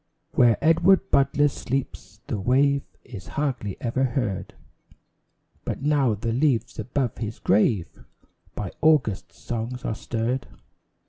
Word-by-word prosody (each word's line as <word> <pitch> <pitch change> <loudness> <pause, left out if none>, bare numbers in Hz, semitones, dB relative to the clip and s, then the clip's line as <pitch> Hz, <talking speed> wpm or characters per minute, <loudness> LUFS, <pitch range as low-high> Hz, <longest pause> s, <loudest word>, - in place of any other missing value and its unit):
Where 120 -3 +4
Edward 175 +4 +4
Butler 140 +2 +4
sleeps, 130 -6 -4
the 105 - -3
wave 140 +6 +3 0.2
Is 105 -7 -10
hardly 130 -9 -2
ever 125 +2 -1
heard; 120 -7 -2 1.1
But - - -4
now 140 -6 +2
the 115 +2 -2
leaves 125 -4 +1
above 125 +2 -2
his 110 -1 -4
grave 100 -3 +1 0.5
By 100 -3 -4
August's 145 -11 +2
songs 120 +2 -5
are - - -1
stirred. 115 +3 -2
125 Hz, 120 wpm, -25 LUFS, 110-140 Hz, 1.1 s, Where